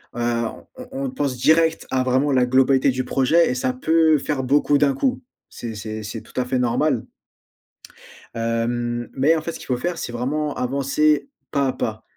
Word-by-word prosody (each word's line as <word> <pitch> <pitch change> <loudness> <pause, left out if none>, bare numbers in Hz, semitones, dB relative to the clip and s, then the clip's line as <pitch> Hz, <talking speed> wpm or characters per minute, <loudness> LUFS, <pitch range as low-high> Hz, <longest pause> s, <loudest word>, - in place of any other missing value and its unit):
heu, - - -5
on 115 -1 -2
on 255 -1 -9 0.2
on - - -2
pense 140 - -2
direct 160 +4 +3
à 130 -1 +1
vraiment 130 +3 +1
la 130 -2 +3
globalité 130 +1 +3
du 130 0 -2
projet 150 +7 +3
et 125 - -1
ça 125 0 -1
peut 160 +3 +3
faire 135 -2 -2
beaucoup 145 +2 +3
d'un 140 -1 +3
coup. 255 - -1 0.3
C'est 115 -2 -7
c'est 110 +1 -6
c'est 105 +2 -6
tout - - -7
à 125 - 0
fait 125 0 -1
normal. 120 -2 +1 1.3
Hem, 120 +1 -2
mais 140 +5 +3
en 160 - -1
fait 170 - -4
ce - - -9
qu'il - - -11
faut 125 -2 0
faire 175 +6 -3
c'est 120 - -4
vraiment 145 +5 -2
avancer, 140 - +1 0.2
pas 140 -2 +1
à 130 - -1
pas. 110 -1 -4
130 Hz, 195 wpm, -22 LUFS, 120-150 Hz, 1.3 s, direct